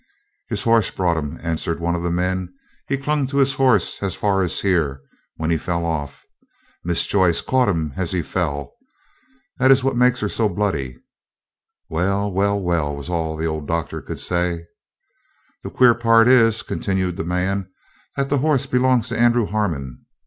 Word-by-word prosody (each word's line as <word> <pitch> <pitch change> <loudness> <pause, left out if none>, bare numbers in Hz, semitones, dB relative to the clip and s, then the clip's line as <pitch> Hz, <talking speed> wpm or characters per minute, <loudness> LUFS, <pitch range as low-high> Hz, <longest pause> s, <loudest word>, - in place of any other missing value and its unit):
"His - - -2
horse 115 -3 +3
brought 90 -3 0
him," 75 +1 -4
answered 85 0 -2
one 85 +1 -1
of 85 - -2
the 85 - -1
men. 90 +1 -1 0.4
"He 135 - 0
clung 145 0 -1
to 140 +1 -3
his 135 -1 +4
horse 130 - +2
as 100 -3 -2
far 100 -2 +1
as 90 -3 0
here, 80 -8 +1 0.4
when 80 +1 -2
he 80 - +1
fell 85 0 -2
off. 80 -4 -4 0.6
Miss 85 -1 +1
Joyce 95 -4 +2
caught 130 -3 +1
him 80 -6 -1
as 95 -3 -2
he 90 -3 -1
fell. 70 -3 -3 0.9
That 130 0 +4
is 135 -1 +5
what 135 -1 0
makes 125 0 +3
her 105 - 0
so 110 +1 0
bloody." 85 -11 -2 0.9
"Well! 100 +5 -1
well! 100 +2 +1
well!" 85 -6 -1
was 70 +4 -7
all 80 -2 -2
that 80 - -4
the - - +1
old 80 -2 -4
Doctor 85 -1 -3
could - - -7
say. 85 -1 -1 1.0
"The - - -5
queer 125 -2 +5
part 115 -1 +4
is," 115 -4 +4
continued 95 -3 -2
the 90 - -3
man, 90 +2 -2 0.5
"that 140 0 -1
the 140 - +1
horse 145 -2 +1
belongs 125 -2 +2
to 115 - -3
Andrew 120 -1 +3
Harmon. 80 - -3
95 Hz, 180 wpm, -21 LUFS, 85-115 Hz, 1.0 s, is